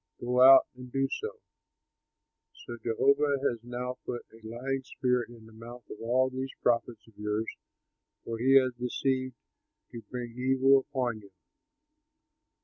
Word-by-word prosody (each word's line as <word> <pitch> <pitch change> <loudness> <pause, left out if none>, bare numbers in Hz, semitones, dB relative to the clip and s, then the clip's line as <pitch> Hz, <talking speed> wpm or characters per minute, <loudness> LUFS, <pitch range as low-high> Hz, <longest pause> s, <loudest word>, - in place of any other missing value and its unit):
Go 125 +1 +1
out 135 +1 +9
and 125 0 -11
do 135 +1 +1
so.' 445 +3 -5 1.3
So 120 - -6
Jehovah 140 +5 +2
has 120 - -2
now 125 +1 -5
put 120 - -5
a 115 0 -17
lying 130 +4 -3
spirit 125 -2 -1
in 115 -2 -14
the 110 - -16
mouth 120 +2 -11
of - - -9
all 130 +3 +1
these 130 +1 -4
prophets 120 0 0
of 115 - -19
yours, 105 +1 -2 0.8
for 115 -1 -4
he 135 +3 +4
has 130 -2 +5
decided 130 +1 -2 0.6
to 120 -1 -8
bring 120 -2 -5
evil 135 +2 +4
upon 125 -4 -2
you." 100 - -16
125 Hz, 145 wpm, -29 LUFS, 115-130 Hz, 1.3 s, out